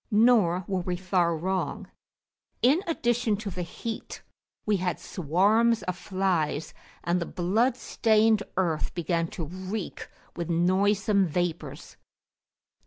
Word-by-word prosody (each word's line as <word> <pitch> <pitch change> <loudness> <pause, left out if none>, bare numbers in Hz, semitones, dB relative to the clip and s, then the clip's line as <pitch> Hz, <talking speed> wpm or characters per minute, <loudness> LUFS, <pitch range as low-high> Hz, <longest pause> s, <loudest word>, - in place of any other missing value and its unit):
Nor 210 -6 +4
were 190 -2 -1
we 180 0 -2
far 175 -2 +1
wrong. 185 +3 -2 0.8
In 280 +8 +5
addition 240 -8 +1
to 205 -1 -5
the 180 - -5
heat, 220 +6 -6 0.4
we 210 -2 +2
had 180 -2 -2
swarms 195 +7 +2
of 180 - -2
flies, 180 -5 -1 0.3
and 175 +1 0
the 170 - -3
blood 225 +8 +1
stained 220 -3 +3 0.2
earth 170 -3 0
began 165 -1 0
to 165 -1 -5
reek 185 +4 -6 0.3
with 170 -1 -4
noisome 195 +3 +2
vapours. 160 -4 -3
185 Hz, 120 wpm, -27 LUFS, 175-215 Hz, 0.8 s, In